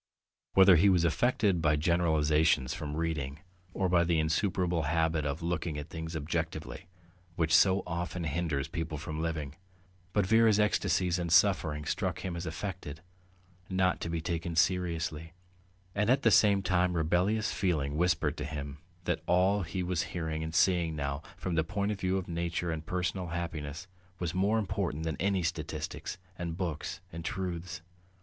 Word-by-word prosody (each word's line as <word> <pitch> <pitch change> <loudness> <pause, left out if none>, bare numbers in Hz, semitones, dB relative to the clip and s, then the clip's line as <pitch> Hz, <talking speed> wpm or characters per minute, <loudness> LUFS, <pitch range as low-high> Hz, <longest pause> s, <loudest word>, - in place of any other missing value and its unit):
Whether 95 -2 +8
he 100 +5 +5
was 90 -3 +4
affected 100 0 +2
by 75 -1 +3
generalizations 80 -4 +2
from 75 -1 -5
reading 80 -3 -2 0.3
or 95 0 0
by 90 -1 +4
the 85 -1 +1
insuperable 85 +2 +1
habit 80 -2 +1
of 70 +3 -3
looking 85 -2 -2
at 75 +1 -6
things 80 0 -5
objectively, 80 +2 -4 0.5
which 80 -2 +2
so 95 0 +5
often 85 +1 -3
hinders 80 -2 -1
people 80 -1 -4
from 80 +1 -5
living, 80 -3 -3 0.5
but 100 0 +2
Vera's 110 +1 +5
ecstasies 90 -4 +2
and 85 -1 -2
suffering 85 -5 +3
struck - - -2
him 90 -2 -4
as 85 0 -4
affected, 80 -2 -6 0.7
not 95 -1 +1
to - - -3
be 85 -1 -2
taken 85 +1 -3
seriously, 80 -2 0 0.6
and 105 +2 +1
at 135 +2 +3
the 115 - +5
same 100 -2 +5
time 90 -1 +1
rebellious 90 +7 +1
feeling 75 -7 0
whispered 90 +3 +1
to - - -3
him 70 -1 -6 0.2
that - - -1
all 95 +3 +3
he 90 +2 -3
was 90 -1 0 0.2
hearing 80 -2 -2
and 80 0 -5
seeing 85 -3 +3
now, 70 0 -3 0.2
from 90 - -3
the 80 -1 +2
point 100 +4 -1
of 105 - -4
view 95 0 0
of 95 - -4
nature 85 0 -2
and 80 0 -5
personal 90 0 -2
happiness, 85 -1 -4 0.3
was 90 -2 -3
more 100 +4 +2
important 95 -7 -2
than 80 -1 -2
any 95 -1 +1
statistics 80 0 -4 0.2
and 85 -1 -4
books 85 -3 -4
and 85 0 -6
truths. 85 -2 -4
85 Hz, 165 wpm, -30 LUFS, 80-90 Hz, 0.7 s, Whether